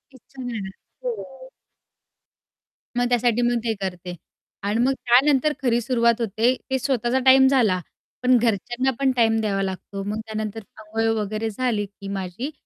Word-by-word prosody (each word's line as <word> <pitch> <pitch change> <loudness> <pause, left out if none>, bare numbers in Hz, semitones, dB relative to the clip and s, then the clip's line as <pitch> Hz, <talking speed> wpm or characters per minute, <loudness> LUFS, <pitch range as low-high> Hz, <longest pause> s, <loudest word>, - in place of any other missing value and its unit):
इच्छा 260 +1 -12
नाही 245 -1 -4
येणार. 190 -2 -5 0.3
हो. - - -6 1.5
मग 245 - +2
त्यासाठी 245 -1 +2
मग 240 0 +2
ते 225 - 0
करते 180 -1 -5 0.5
आणि 205 +3 0
मग 260 +3 +3
त्यानंतर 270 +4 +3
खरी 240 -3 +2
सुरुवात 235 -1 +2
होते, 225 +4 +1
ते 265 - +1
स्वतःचा 255 -1 0
टाईम 265 0 +7
झाला 235 -9 +3 0.4
पण 250 0 +5
घरच्यांना 240 +3 0
पण 270 -1 +3
टाईम 225 -2 +3
द्यावा 200 -2 0
लागतो. 195 +1 -5
मग 210 +2 -3
त्यानंतर 215 0 -4 0.2
अंघोळ 220 +1 -2
वगैरे 215 +2 -2
झाली, 220 -2 -1
की 200 0 -12
माझी 195 - -4
235 Hz, 150 wpm, -23 LUFS, 210-255 Hz, 1.5 s, टाईम